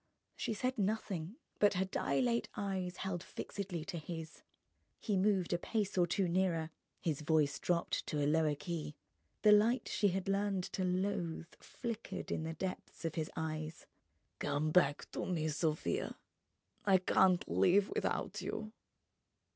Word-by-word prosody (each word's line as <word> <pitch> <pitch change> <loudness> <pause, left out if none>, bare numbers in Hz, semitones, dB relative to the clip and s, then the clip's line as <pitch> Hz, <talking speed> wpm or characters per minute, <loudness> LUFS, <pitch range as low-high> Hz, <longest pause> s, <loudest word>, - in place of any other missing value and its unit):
She 220 - -2
said 255 +2 -1
nothing, 195 -3 -1 0.2
but 205 -1 +5
her 185 +1 +2
dilate 235 +5 +1
eyes 190 -3 -2
held 185 -2 -2
fixedly 180 -4 -5
to 175 -3 -4
his. 160 0 -7 0.6
He 210 - -1
moved 190 -2 +2
a 175 - +1
pace 210 +1 -1
or 175 -2 +4
two 190 +2 +1
nearer, 170 -3 +1 0.3
his 155 -3 -1
voice 150 -2 +2
dropped 170 -1 0
to 150 - -1
a 145 - +2
lower 155 0 +3
key, 150 -1 -4 0.5
the 210 - +8
light 220 +5 +5
she 205 - +2
had 190 0 -1
learned 195 -1 +1
to 190 - 0
loathe 180 -3 -1
flickered 235 -3 -5
in - - 0
the 160 - -3
depths 185 -1 -5
of 165 - -1
his 155 -1 -2
eyes. 155 0 -4 0.5
"Come 155 +2 0
back 150 -4 +4
to - - -3
me, 160 -4 0
Sofia! 155 +1 -1 0.7
I 195 -2 +6
can't 185 0 +4
live 195 +2 +4
without - - -1
you 215 0 -4
180 Hz, 150 wpm, -35 LUFS, 160-200 Hz, 0.7 s, the